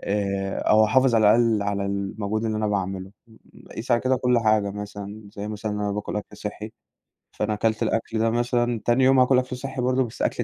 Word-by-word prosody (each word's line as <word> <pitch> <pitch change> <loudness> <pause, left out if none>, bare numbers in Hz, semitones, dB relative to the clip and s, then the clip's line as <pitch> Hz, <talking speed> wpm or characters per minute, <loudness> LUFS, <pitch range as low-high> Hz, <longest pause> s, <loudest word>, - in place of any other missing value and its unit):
آآ، 100 -1 -2
أو 110 0 +4
أحافظ 125 +3 +3
على 110 -1 +4
الأقل 115 -3 +2
على 100 -1 -2
المجهود 100 +2 -3
اللي 110 -1 -1
أنا 110 0 0
باعمله. 95 -1 -3 0.7
قيس 120 +3 -6
على 120 - +3
كده 130 0 +1
كل 125 -1 +2
حاجة 110 -2 +2
مثلًا، 105 +1 -7
زي 105 0 -6
مثلًا 105 0 -4
إن 105 - -3
أنا 100 -1 -1
باكل 105 0 -4
أكل 105 0 -6
صحي، 105 +1 -6 0.6
فأنا 105 - -2
كلت 110 +1 0
الأكل 110 0 -1
ده 115 - +2
مثلًا، 120 0 0
تاني 120 +2 +3
يوم 135 0 +5
هاكل 125 0 +5
أكل 125 0 -4
صحي 135 0 -5
برضه 130 +1 +2
بس 115 - -9
أكل - - 0
110 Hz, 205 wpm, -24 LUFS, 105-120 Hz, 0.7 s, يوم